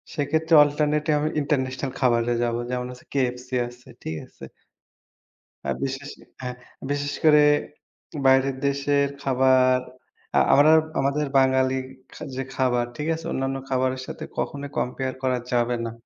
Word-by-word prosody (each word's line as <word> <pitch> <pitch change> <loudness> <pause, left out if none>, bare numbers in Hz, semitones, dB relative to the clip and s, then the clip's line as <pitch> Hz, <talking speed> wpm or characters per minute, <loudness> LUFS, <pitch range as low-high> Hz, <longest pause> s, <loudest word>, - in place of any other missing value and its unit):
সেক্ষেত্রে 160 +3 0
alternative 150 +1 0
আমি 155 +1 0
international 135 -2 -1
খাবারে 120 -2 +2
যাবো। 120 0 -1
যেমন 125 0 -2
হচ্ছে 125 -1 -13
KFC 125 -2 -1 0.2
আছে। 120 +1 -15 0.2
ঠিক 80 - -4
আছে? - - -13 1.2
আ - - -2
বিশেষে 135 +1 -5 0.2
হ্যাঁ, 125 -1 -5 0.4
বিশেষ 145 0 -2
করে 150 -1 +7 0.9
বাইরের 135 0 +4
দেশের 140 0 +1
খাবার 130 -1 +3 0.6
আ - - +4 0.2
আমরা 155 +3 +7 0.2
আমাদের 140 +2 +1
বাঙালি 130 0 +3 0.4
খা - - -9
যে 135 - -2
খাবার 125 -2 +1
ঠিক 150 - -3
আছে, 165 - -9
অন্যান্য 135 0 -2
খাবারের 130 0 0
সাথে - - -7
কখনোই 140 0 -3
compare 130 +1 -2
করা 130 -1 +1
যাবে 120 0 +1
না। 115 - -4
130 Hz, 140 wpm, -24 LUFS, 125-145 Hz, 1.2 s, করে